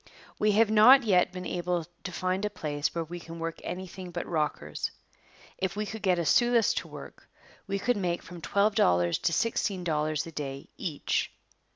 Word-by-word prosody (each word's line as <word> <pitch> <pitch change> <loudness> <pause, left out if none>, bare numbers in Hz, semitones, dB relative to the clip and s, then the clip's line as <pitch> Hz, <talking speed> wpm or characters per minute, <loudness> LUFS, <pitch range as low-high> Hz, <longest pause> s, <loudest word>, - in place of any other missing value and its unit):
We 210 0 +3
have 215 +1 +4
not 245 +5 +8
yet 185 -5 +3
been 180 0 -7
able 175 -1 -1 0.2
to 185 - -3
find 185 +2 -1
a 210 - +1
place 150 -7 -3
where 165 - 0
we 175 +2 -7
can 165 0 -9
work 165 0 -4
anything 185 0 -6
but 175 0 -4
rockers. 150 - -2 0.7
If 190 -1 -1
we 210 +1 -2
could 220 +1 -6
get 185 -3 +2
a 170 - -1
sluice 240 +7 +4
to - - -2
work, - - -11 0.4
we 195 0 -1
could 245 +4 +1
make 175 -3 -1
from 175 -1 -10
twelve 200 +5 +2
dollars 85 - +3
to - - +1
sixteen 200 -2 0
dollars 155 -2 0
a 165 - -8
day 140 -3 -6
each. 155 -5 -2
180 Hz, 190 wpm, -28 LUFS, 165-205 Hz, 0.7 s, not